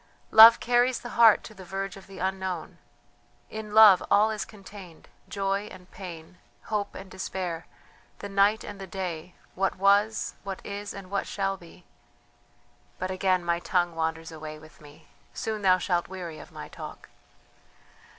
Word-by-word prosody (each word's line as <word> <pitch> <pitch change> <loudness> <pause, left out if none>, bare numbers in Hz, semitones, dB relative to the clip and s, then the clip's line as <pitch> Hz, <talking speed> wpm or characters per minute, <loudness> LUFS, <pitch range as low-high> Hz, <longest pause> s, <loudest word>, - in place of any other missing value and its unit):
"Love 225 +1 +10
carries 245 +1 +2
the 240 - -7
heart 230 -3 +5
to 220 - -10
the 190 -2 -12
verge 195 +2 -5
of 195 - -13
the 195 -1 -12
unknown. 190 -2 -4 0.7
In 215 -1 -7
Love 210 -4 +9
all 215 +2 +4
is 215 - -3
contained: 195 -5 -13 0.2
joy 195 +1 -1
and 185 -1 -14
pain, 180 -2 -10 0.3
hope 205 -1 -2
and 190 0 -10
despair, 180 -3 -5 0.5
the 200 - -7
night 200 +2 +2
and 205 -1 -9
the 195 - -7
day; 180 -2 -5 0.2
what 195 +1 0
was, 200 +3 +2
what 195 -1 -5
is, 200 0 -6
and 195 -1 -10
what 200 -1 -1
shall 195 -1 -1
be... 175 -3 -16 1.1
but 185 +1 -3
again 185 -1 +1
my 170 0 +1
tongue 175 -1 0
wanders 160 0 -3
away 155 -1 -8
with 155 0 -17
me, 145 0 -16 0.3
soon 220 -1 -3
thou 185 -2 +5
shalt 180 -1 -1
weary 175 -4 -7
of - - -13
my - - -8
talk. - - -10
190 Hz, 160 wpm, -27 LUFS, 175-205 Hz, 1.1 s, Love